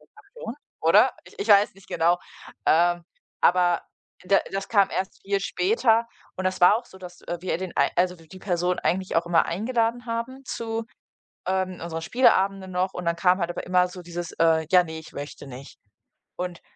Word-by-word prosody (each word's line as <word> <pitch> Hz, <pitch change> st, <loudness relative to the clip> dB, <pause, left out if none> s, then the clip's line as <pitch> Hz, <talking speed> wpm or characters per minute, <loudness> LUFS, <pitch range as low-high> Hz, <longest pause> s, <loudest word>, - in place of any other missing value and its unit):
kommt -, -, -19 dB
davor, 240 Hz, -, -6 dB, 0.3 s
oder? 205 Hz, +10 st, +5 dB
Ich -, -, -17 dB
ich 205 Hz, -, -3 dB
weiß 205 Hz, -2 st, +5 dB
nicht 195 Hz, 0 st, -19 dB
genau, 170 Hz, +2 st, +2 dB, 0.5 s
ähm, 175 Hz, +1 st, +3 dB, 0.4 s
aber 175 Hz, -1 st, +3 dB, 0.4 s
da 195 Hz, +1 st, +4 dB
das 195 Hz, 0 st, -4 dB
kam 200 Hz, -3 st, +4 dB
erst 190 Hz, -, -4 dB
viel 200 Hz, 0 st, 0 dB
später 235 Hz, -, +2 dB, 0.3 s
und 185 Hz, -, -4 dB
das 185 Hz, -1 st, -1 dB
war 205 Hz, +5 st, +7 dB
auch 240 Hz, -, -9 dB
so, 190 Hz, -, -15 dB
dass, 180 Hz, -1 st, -11 dB
äh, 175 Hz, -, -4 dB
wir 185 Hz, -, -1 dB
den 185 Hz, -1 st, -6 dB
ei -, -, +3 dB
also 180 Hz, 0 st, +2 dB
w 165 Hz, -, -18 dB
die 185 Hz, +2 st, -12 dB
Person 180 Hz, -1 st, 0 dB
eigentlich 185 Hz, 0 st, -1 dB
auch 170 Hz, -, +1 dB
immer 175 Hz, -1 st, +3 dB
eingeladen 230 Hz, +5 st, -1 dB
haben 235 Hz, +4 st, -4 dB
zu, 225 Hz, -1 st, -4 dB, 0.6 s
ähm, 185 Hz, -1 st, -1 dB
unseren 165 Hz, -1 st, -4 dB
Spieleabenden 195 Hz, -4 st, +2 dB
noch 185 Hz, +1 st, -1 dB
und 180 Hz, -, -6 dB
dann 170 Hz, 0 st, +1 dB
kam 180 Hz, +2 st, +3 dB
halt 170 Hz, 0 st, -1 dB
aber -, -, -6 dB
immer 180 Hz, 0 st, +3 dB
so 180 Hz, 0 st, -10 dB
dieses, 175 Hz, 0 st, -6 dB
äh: 160 Hz, -1 st, +3 dB
„Ja 180 Hz, -1 st, +7 dB
ne, 160 Hz, -1 st, -7 dB
ich 160 Hz, -, -14 dB
möchte 145 Hz, 0 st, -8 dB
nicht.“ 130 Hz, +1 st, -11 dB, 0.6 s
Und 180 Hz, -1 st, -5 dB
185 Hz, 195 wpm, -25 LUFS, 175-200 Hz, 0.6 s, war